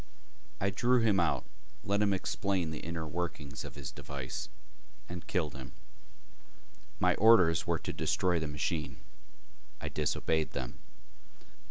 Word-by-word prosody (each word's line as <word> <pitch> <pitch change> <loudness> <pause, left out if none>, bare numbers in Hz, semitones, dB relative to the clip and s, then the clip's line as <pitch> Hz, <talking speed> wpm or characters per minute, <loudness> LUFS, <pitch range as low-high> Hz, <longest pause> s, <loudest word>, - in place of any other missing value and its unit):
I 100 +1 +1
drew 120 +5 +3
him 105 -4 +4
out, 85 -2 +1 0.4
let 100 +1 +1
him 105 -1 +4
explain 95 -2 0
the 80 - -4
inner 85 -1 -4
workings 75 -4 -4
of - - -8
his 70 -2 -6
device 70 -2 -5 0.6
and 90 0 -7
killed 80 -6 0
him. 65 -1 -8 1.3
My - - +4
orders 95 -8 +6
were - - +2
to - - -5
destroy 90 -2 +1
the 80 - -2
machine. 75 -1 -2 0.8
I - - -4
disobeyed 75 +1 0
them. 60 -1 -4
85 Hz, 135 wpm, -32 LUFS, 75-95 Hz, 1.3 s, orders